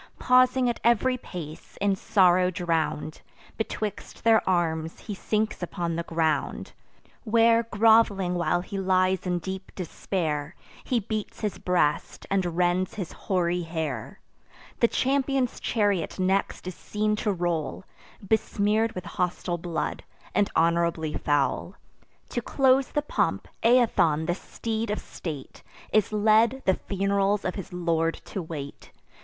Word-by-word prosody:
Pausing 255 0 +4
at 240 - -1
ev'ry 240 +2 +3
pace, 165 -10 -9
in 200 -1 +2
sorrow 185 -1 +4
drown'd, 165 -4 -2 0.3
Betwixt 215 -1 -4
their 225 -1 +5
arms 165 -3 0
he 210 - -6
sinks 215 +2 -1
upon 170 -1 -3
the 170 - -1
ground; 165 -2 -1 0.5
Where 230 0 +4
grov'ling 220 -4 +4
while 175 0 +1
he 195 +2 -5
lies 185 0 +2
in 180 0 +1
deep 190 +2 -6
despair, 160 -4 -3 0.3
He 250 - +1
beats 215 +1 -5
his 210 -2 -2
breast, 170 -4 0
and 180 -4 0
rends 180 +1 +1
his 190 -6 -5
hoary 180 -2 -1
hair. 160 -8 -4 0.6
The 235 - +5
champion's 270 0 0
chariot 205 -6 0
next 190 +1 0
is 185 - -4
seen 210 +4 -1
to 210 - 0
roll, 175 -3 -2 0.4
Besmear'd 220 +1 +1
with 185 - -6
hostile 175 -1 -2
blood, 170 -1 -3 0.3
and 205 - +2
honourably 165 -1 +1
foul. 145 -2 0 0.5
To 240 - -2
close 265 +1 +3
the 295 - -1
pomp, - - -1
Aethon, 225 -10 +3
the 175 - +1
steed 220 +4 -4
of 210 - 0
state, 150 -6 -7 0.3
Is 215 -2 +3
led, 220 +4 +3
the 190 - +4
fun'rals 200 +1 0
of 185 - 0
his 195 - -7
lord 165 -2 0
to 195 - -4
wait. 150 -4 -8
190 Hz, 135 wpm, -26 LUFS, 170-220 Hz, 0.6 s, their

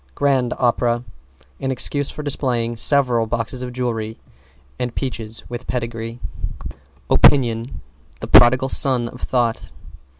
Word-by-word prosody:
=GRAND 130 -4 +1
OPERA= 120 -1 +1 0.6
An 135 - -3
excuse 140 +2 0
for 150 - -7
displaying 125 -5 0
several 125 -2 +2
boxes 115 +2 -3
of 125 -1 -5
jewelry 115 -3 -3 0.6
and 125 -1 -3
peaches 115 -4 -5
with 120 +1 -7
pedigrees. 115 -2 -4 0.9
=OPINION= 115 - +3 0.4
The - - -5
prodigal 130 +2 +6
son 125 -4 +2
of 125 - -12
Thought. 120 -3 -1
120 Hz, 120 wpm, -20 LUFS, 115-130 Hz, 0.9 s, prodigal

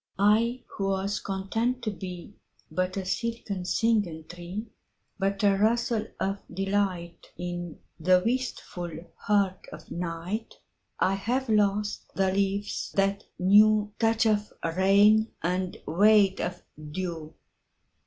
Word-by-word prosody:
I 225 +5 +3
who 195 - -4
was 195 +1 -1
content 225 +6 -2
to 215 - -1
beBut 185 0 -6
a 190 - -3
silken 205 -2 -3
singing 205 -6 +1
tree, 175 +5 -6 0.5
But 195 +1 0
a 200 -1 +5
rustle 225 +2 +1
of 195 +1 -1
delightIn 175 -2 -3 0.2
the 180 +2 +4
wistful 235 -8 -2 0.3
heart 200 -3 0
of 155 +1 -11
night,I 180 +3 -4
have 240 +6 -1
lost 210 -1 +1
the 190 -1 +2
leaves 200 +1 -1
that 195 +1 +1
knewTouch 215 +3 +4
of 210 -1 +1 0.2
rain 205 +4 +5
and 180 +1 -1
weight 200 +2 +4
of 180 - -4 0.3
dew. 165 -2 -5
195 Hz, 105 wpm, -27 LUFS, 185-215 Hz, 0.5 s, a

